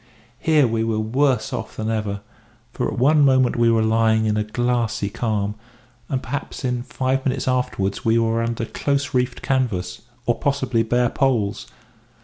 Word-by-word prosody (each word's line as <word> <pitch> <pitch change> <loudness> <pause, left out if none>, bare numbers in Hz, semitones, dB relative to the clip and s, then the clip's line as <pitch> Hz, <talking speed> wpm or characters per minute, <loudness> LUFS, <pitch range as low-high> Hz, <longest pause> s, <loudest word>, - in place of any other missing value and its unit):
Here 155 -3 +4
we 115 -1 0
were 115 -1 0
worse 125 +2 +1
off - - -5
than 110 0 -2
ever, 105 -2 -2 0.5
for - - -1
at - - -6
one 145 +4 +4
moment 130 -2 +4
we 120 -1 +3
were 115 -1 +3
lying 110 0 +2
in 105 -1 +1
a 105 - +1
glassy 115 -2 -1
calm, 105 -3 -1 0.6
and 130 -2 -2
perhaps 140 0 -5
in 125 -1 -1
five 130 +1 -1
minutes 130 -2 -1
afterwards 125 -6 -1
were 115 0 +2
under 115 0 -2
close 140 +4 -1
reefed 125 -1 -1
canvas, 110 -10 -1 0.2
or 120 - 0
possibly 130 -4 0
bare 120 +1 +1
poles. 120 -8 0
115 Hz, 160 wpm, -22 LUFS, 110-130 Hz, 0.6 s, Here